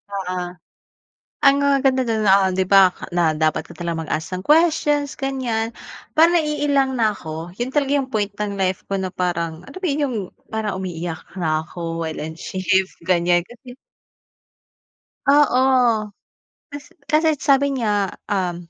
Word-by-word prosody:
Oo. 185 -2 -3 1.1
Ang 275 0 +7
maganda 275 -2 +2
do'n, 220 -1 0
ah, 195 -1 +5
'di 190 0 +1
ba 195 0 +9 0.3
na 160 -3 +2
dapat 155 0 +2
ka - - -13
talagang 170 -2 -3
mag-ask 160 +4 -3
ng 185 - -3
questions 295 - +2
ganiyan. 255 -5 -2 0.5
Parang 330 +2 +6
naiilang 285 -3 0
na 220 -2 +2
'ko 160 -2 -7
'yun 245 - -1
talaga 280 -1 0
yung 265 - -5
point 205 -3 -1
ng 205 -1 -3
life 190 -1 0
ko 195 - -1
na 190 -1 -3
parang 170 -3 -2
alam - - -9
mo 375 - -3
yung 285 -3 0 0.3
parang 210 -3 -3
umiiyak 175 -1 -6
na 155 -3 0
'ko 165 0 -6
while 160 -1 -4
on 160 0 -6
shift, 190 0 0
ganiyan 175 -1 +2
kasi 245 +3 -14 1.5
oo. 280 -3 +4 1.1
Kasi 290 0 -9 0.2
kasi 310 +2 +3
sabi 280 0 +3
niya, 205 -6 0 0.2
um, 175 -4 -2
205 Hz, 150 wpm, -21 LUFS, 175-275 Hz, 1.5 s, ba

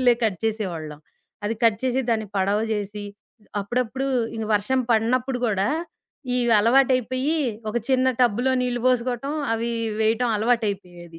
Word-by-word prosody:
పేపర్‌లే 245 -1 +6
cut 200 -5 0
చేసేవాళ్ళం. 175 -9 -3 0.5
అది 220 +2 0
cut 215 -2 +4
చేసి, 255 +1 +1
దాన్ని 220 -1 0
పడవ 200 +2 +2
జేసి 205 0 -4 0.6
అప్పుడప్పుడూ 250 +5 -2 0.3
ఇది 220 -1 -3
వర్షం 255 +6 +1
పడినప్పుడు 245 +3 +1
గూడా, 200 -2 +1 0.7
ఈ - - +1 0.2
అలవాటయిపోయి 255 +5 +2 0.3
ఒక 215 - -3
చిన్న 260 -1 +3
టబ్బులో 245 +2 +3
నీళ్లు 245 -1 -1
బోసుకోవటం 255 +2 0 0.2
అవి 230 +1 -1 0.3
వేయటం 225 +2 +2
అలవాటయిపోయేది. 200 -7 -2
230 Hz, 130 wpm, -24 LUFS, 205-250 Hz, 0.7 s, పేపర్‌లే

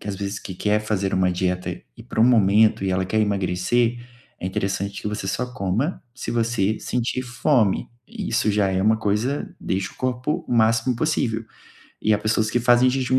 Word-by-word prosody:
que 105 - -8
às 100 - -3
vezes, 100 +1 -4
que 95 - -7
quer 105 +3 +1
fazer 100 -3 -1
uma 95 -1 +2
dieta 90 0 -1 0.3
e, - - -11
para - - -3
um - - +7
momento 110 -3 +4
e 95 - 0
ela 95 0 +1
quer 110 +2 +1
emagrecer, 105 +4 +1 0.4
é 90 - -3
interessante 100 +1 -2
que 105 - -2
você 105 -2 -4
só 125 +6 -1
coma 120 - -2
se 125 - -5
você 115 -3 0
sentir 125 +1 -2
fome 120 -3 +1 0.2
e - - -5
isso 110 -1 +1
já 105 -1 +2
é 95 0 0
uma 110 +1 +4
coisa 110 +7 -1
deixa 95 0 -2
o - - -21
corpo 130 +6 -2
o - - -2
máximo 115 +1 +3
possível. 115 -6 0 0.6
E 110 0 +4
há - - 0
pessoas 110 0 0
que 120 - +1
fazem 125 +1 +5
jejum 130 0 +1
110 Hz, 200 wpm, -23 LUFS, 100-120 Hz, 0.6 s, um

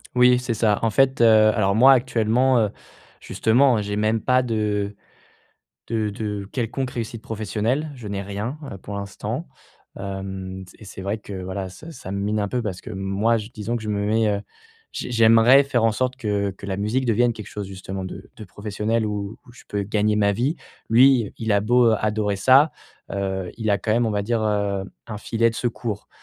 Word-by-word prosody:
Oui, 125 0 +5
c'est 125 -2 -2
ça, 105 -2 +2
en 115 - +3
fait, 135 +2 +2
heu, 110 -2 +6
alors 100 -2 +1
moi, 130 +4 +7
actuellement, 120 +1 +2
heu, 105 -2 +2 0.5
justement, 120 0 +2
j'ai 105 0 -3
même 110 +1 +1
pas 130 0 +3
de 105 -3 -1 0.9
de 110 -2 -1
de 105 -1 -4
quelconque 130 +1 -2
réussite 115 -1 -5
professionnelle, 110 +7 -2
je 115 -5 -8
n'ai 100 -1 -3
rien, 105 +9 -5
heu, - - -6
pour 100 +2 -8
l'instant, 100 -1 -5 0.5
hem, 95 -1 -6
s - - -17
et 105 - -13
c'est 95 -1 -9
vrai 100 +3 -2
que, 95 -3 -7
voilà, 95 +1 -4
ça 155 - -11
ça 95 -9 -9
me 100 - -2
mine 105 +1 0
un 100 - -1
peu 125 +2 -1
parce 95 -5 -4
que - - -10
moi 95 +4 0
j 110 +1 -5
disons 115 +2 -3
que 110 - -6
je 105 - -5
me 100 -1 -1
mets, 110 0 +2
heu, 100 -1 0 0.5
j - - -5
j'aimerais 115 +3 +6
faire 120 -5 0
en 115 - +4
sorte 130 +3 -1
que 100 -4 -1
que 95 +1 -11
la 95 -1 -2
musique 115 +6 -1
devienne 120 +1 +3
quelque 110 -2 -9
chose, 105 -2 -6
justement, 95 0 -6
de 95 +1 -9
de 110 - -9
professionnel, 105 +3 -2
où 105 +1 -4
où 120 - -15
je 120 - -16
peux 100 -1 -2
gagner 105 +1 +1
ma 100 -1 +3
vie. 135 - 0 0.3
Lui, 125 -2 +5
il 110 -2 0
a 100 - +3
beau 120 +1 +4
adorer 105 -1 0
ça, 130 +9 +5 0.4
heu, 95 -2 -2
il 110 -2 -1
a 100 - +3
quand 110 - -1
même, 120 0 +2
on - - 0
va 105 -1 -1
dire, 115 +1 0
heu, 100 -2 0 0.2
un 105 -3 -6
filet 115 +2 +1
de - - -10
secours. 115 -3 -3
110 Hz, 210 wpm, -23 LUFS, 100-115 Hz, 0.9 s, moi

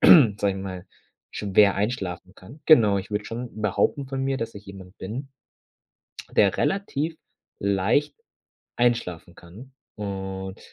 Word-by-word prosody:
sage 115 - +8
ich 95 - 0
mal, 95 -2 -6 0.4
schwer 100 0 +3
einschlafen 100 -4 -3
kann. 125 +12 -14
Genau, 110 -10 +6
ich 100 +2 -4
würde 105 0 -2
schon 120 +1 -5
behaupten 105 +7 +1
von 135 0 -3
mir, 135 0 0
dass 115 -2 -4
ich 100 0 -10
jemand 95 -2 -12
bin 125 +8 -6 1.0
der 100 -4 +3
relativ 165 -5 -1 0.4
leicht 100 +8 +1 0.6
einschlafen 90 -8 0
kann. 105 +11 -14 0.2
Und 95 -2 -5
105 Hz, 130 wpm, -25 LUFS, 95-125 Hz, 1.0 s, sage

